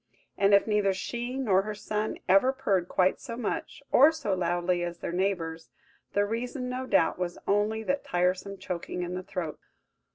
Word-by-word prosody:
And 200 0 +5
if 200 - +4
neither 210 -3 +2
she 240 +6 -4
nor 205 -8 +3
her 210 +1 -5
son 210 +1 -3
ever 195 +7 +5
purred 200 -10 0
quite 185 0 +2
so 235 -4 -6
much, 280 +5 -4
or 285 +5 +7
so 315 -11 -2
loudly 175 0 0
as 175 0 -3
their - - -4
neighbours, 170 -3 -2 0.4
the 205 0 +3
reason, 245 +4 -3
no 255 +1 -4
doubt, 165 -4 +2
was 175 -1 -2
only 210 +2 +1
that 275 +5 -1
tiresome 185 +3 0
choking 180 -1 -4
in 175 0 -4
the 180 - -3
throat! 180 -4 -5
200 Hz, 175 wpm, -28 LUFS, 180-230 Hz, 0.4 s, or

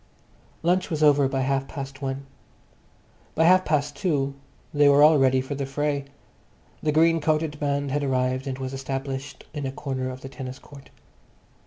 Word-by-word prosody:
Lunch 180 +2 +2
was 155 -3 -1
over 145 -2 +5
by 135 0 -1
half 135 0 0
past 135 -1 -7
one. 135 0 -4 1.1
By 160 - +3
half 185 +2 +6
past 145 -2 0
two 145 -8 0 0.4
they 145 -1 +5
were 140 +1 +6
all 155 -1 +7
ready 130 -1 +4
for 130 +2 -5
the 140 -1 -3
fray. 145 0 -1 0.8
The 150 - +1
green 165 +1 +4
coated 155 -1 0
band 140 -1 -1
had 145 +1 0
arrived 130 0 0
and 130 -1 -3
was 130 0 -5
established 135 0 -5
in 145 -3 -3
a - - -3
corner 130 -2 -4
of 130 0 -8
the 135 - -8
tennis 130 0 -7
court. 140 -1 -15
140 Hz, 175 wpm, -25 LUFS, 135-150 Hz, 1.1 s, all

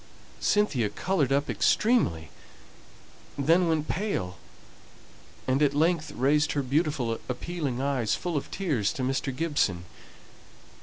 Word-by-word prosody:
Cynthia 140 - +2
coloured 145 - 0
up 140 +1 +2
extremely, 150 - +1 1.1
then 165 +6 +3
went 155 -2 0
pale, 165 - -2 1.1
and 130 +2 +2
at 145 -1 +3
length 160 +1 +1
raised 145 +5 +2
her 145 - 0
beautiful 135 -4 0
appealing 140 0 -3
eyes 135 -6 0
full 175 -2 -4
of 145 - -2
tears 145 - 0
to 130 - -4
Mr. 135 0 -1
Gibson. 130 - 0
145 Hz, 115 wpm, -27 LUFS, 125-165 Hz, 1.1 s, then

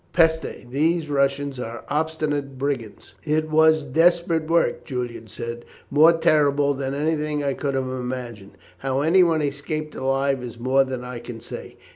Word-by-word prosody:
Peste! 160 -6 +1
these 155 +2 +1
Russians 140 -1 0
are 120 -1 -6
obstinate 150 -3 -2
brigands." 130 -5 -4
"It 155 0 0
was 160 0 +5
desperate 165 +2 +2
work," 170 +1 +1
Julian 120 -4 -5
said, 115 +1 -6 0.3
"more 155 +4 +7
terrible 145 -3 +3
than 135 0 -3
anything 150 0 -1
I 140 -1 0
could 140 0 -2
have 135 - 0
imagined. 125 -6 -6 0.2
How 135 0 -1
anyone 165 0 +4
escaped 150 +2 -3
alive 135 0 0
is 120 -2 -7
more 130 +3 +3
than 130 -2 -5
I 125 -1 -6
can 120 -1 -8
say. - - -9
140 Hz, 150 wpm, -23 LUFS, 130-155 Hz, 0.3 s, more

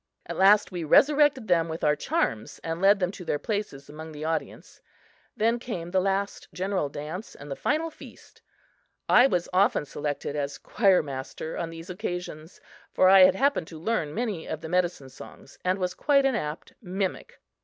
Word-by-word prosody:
At - - -6
last 200 +2 +5
we 175 -2 -4
resurrected 280 - +4
them 165 -2 +2
with 160 +1 -6
our 150 0 +3
charms 110 -6 -2
and 165 +1 -4
led 200 +1 +5
them 180 -1 0
to 190 - -10
their 150 - -1
places 200 -7 -4
among 160 +2 -9
the 150 +1 -6
audience. 160 0 -4 0.6
Then 230 +2 +2
came 175 -8 -6
the 190 0 +2
last 195 +1 -2
general 185 -5 -2
dance 155 +9 -7
and 145 0 -10
the - - -2
final 320 - -1
feast. - - -15 0.7
I 245 +2 +6
was 180 -9 -1
often 185 -5 +3
selected 145 0 -4
as 140 -1 -3
choir 195 -5 +2
master 140 +3 -6
on 170 - -3
these 165 +2 -9
occasions, 180 -4 -6 0.3
for 185 - +4
I 195 0 +8
had 185 0 +4
happened 275 - +1
to 160 - -10
learn 165 -5 -1
many 215 -8 -3
of 155 - -5
the 160 - -7
medicine 175 -6 -1
songs 130 +1 -14
and 185 +1 +1
was 180 -1 -2
quite 280 +3 +2
an 270 - +2
apt 155 -8 -4
mimic. 195 - -4
180 Hz, 185 wpm, -26 LUFS, 155-205 Hz, 0.7 s, I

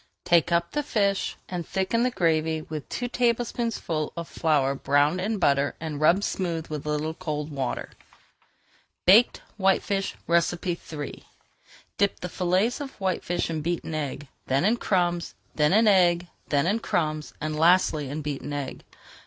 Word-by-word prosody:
Take 170 -1 +4
up 170 0 +1
the 295 - 0
fish 200 -8 0
and 180 -2 -4
thicken 190 +7 0
the 250 - +3
gravy 160 -6 +1
with 155 -2 -7
two 245 - -3
tablespoonfuls 235 - -1
of 170 -1 -4
flour 145 -4 +1
browned 145 +5 +2
in 215 +3 -1
butter 140 -5 +2
and 155 -2 -5
rubbed 175 +6 +4
smooth 170 -6 -2
with 150 -1 -5
a - - -1
little 150 +1 -1
cold 155 -3 -4
water. 135 -3 -3 1.1
BAKED 215 +7 +6
WHITE 195 -2 +3
FISH 195 -1 -2
III 170 -3 -1 0.8
Dip 200 0 +2
the 180 - -5
fillets 185 - +1
of 275 -2 -6
whitefish 180 -2 -1
in 160 -1 -2
beaten 170 0 -3
egg, 145 -2 -4 0.2
then 135 +6 +2
in 225 +4 +3
crumbs, 175 -5 0 0.2
then 150 0 +2
in 220 +3 +5
egg, 175 -3 +4 0.2
then 145 0 +2
in 205 +6 +1
crumbs, 155 -7 -2
and 155 0 -3
lastly 160 -3 +3
in 150 +2 -4
beaten 145 0 -4
egg. 140 -2 -5
170 Hz, 155 wpm, -26 LUFS, 150-195 Hz, 1.1 s, BAKED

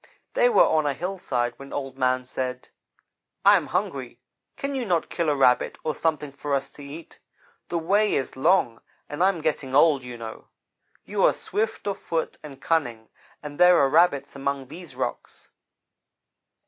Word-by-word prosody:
They - - +4
were 460 - +6
on 155 -2 +2
a 140 - 0
hillside 150 -10 -2
when 140 0 -11
Old 135 -2 -5
Man 130 -1 +1
said: 130 0 -4 0.8
'I - - +8
am - - -4
hungry. - - -3 0.4
Can 275 0 -3
you 265 -2 -2
not 175 -7 -1
kill 170 -3 0
a 145 - +2
Rabbit 125 -2 +3
or 155 - -1
something 150 -3 -1
for 140 +1 -2
us 140 0 -3
to 145 - -12
eat? 150 +4 -11 0.5
The 170 - -1
way 200 +6 +2
is 135 - -2
long, 135 -5 +2 0.3
and 145 +4 -2
I 190 - +6
am 175 -5 -3
getting 145 -4 -2
old, 145 -2 +5
you 125 -1 -8
know. 115 -1 -9 0.6
You 200 -1 -1
are - - +5
swift 220 0 -3
of 200 -1 -2
foot 165 -1 -3
and 140 -3 -11
cunning, 120 -10 -1 0.3
and 145 -1 -8
there 180 0 +7
are 140 -3 +4
Rabbits 145 -3 +2
among 140 -1 -3
these 170 +2 -10
rocks.' - - -5
145 Hz, 175 wpm, -25 LUFS, 135-175 Hz, 0.8 s, I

